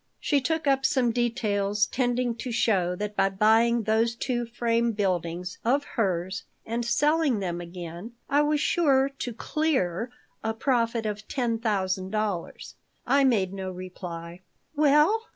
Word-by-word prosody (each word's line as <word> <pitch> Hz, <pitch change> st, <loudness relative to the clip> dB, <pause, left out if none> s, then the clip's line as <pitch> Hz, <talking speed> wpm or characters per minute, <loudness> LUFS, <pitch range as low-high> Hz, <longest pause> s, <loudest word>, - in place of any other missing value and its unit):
She 285 Hz, -2 st, +1 dB
took 320 Hz, +4 st, -1 dB
up 270 Hz, -1 st, +2 dB
some 260 Hz, -4 st, +2 dB
details 210 Hz, -4 st, +1 dB
tending 245 Hz, -1 st, 0 dB
to 245 Hz, +2 st, -5 dB
show 190 Hz, -6 st, +1 dB
that 210 Hz, +2 st, -4 dB
by 195 Hz, -, +3 dB
buying 225 Hz, +4 st, +3 dB
those 225 Hz, +2 st, +1 dB
two 240 Hz, -1 st, -2 dB
frame 235 Hz, 0 st, 0 dB
buildings 180 Hz, -3 st, -2 dB
of 275 Hz, +5 st, +2 dB
hers 190 Hz, -6 st, -2 dB, 0.2 s
and 230 Hz, +2 st, -2 dB
selling 295 Hz, +2 st, +2 dB
them 175 Hz, -3 st, -3 dB
again 175 Hz, +4 st, -8 dB
I 290 Hz, +1 st, +3 dB
was 295 Hz, 0 st, +2 dB
sure 275 Hz, -4 st, +3 dB
to 275 Hz, -3 st, -5 dB
"clear" 235 Hz, -, -1 dB, 0.3 s
a 220 Hz, 0 st, -1 dB
profit 230 Hz, -2 st, 0 dB
of 210 Hz, 0 st, -4 dB
ten 235 Hz, -4 st, -1 dB
thousand 190 Hz, -4 st, -1 dB
dollars 210 Hz, -4 st, -3 dB, 0.3 s
I 280 Hz, 0 st, +4 dB
made 205 Hz, -8 st, +2 dB
no 190 Hz, -1 st, -4 dB
reply 180 Hz, -1 st, -8 dB, 0.3 s
"Well? 300 Hz, +9 st, +4 dB
230 Hz, 145 wpm, -26 LUFS, 190-255 Hz, 0.3 s, I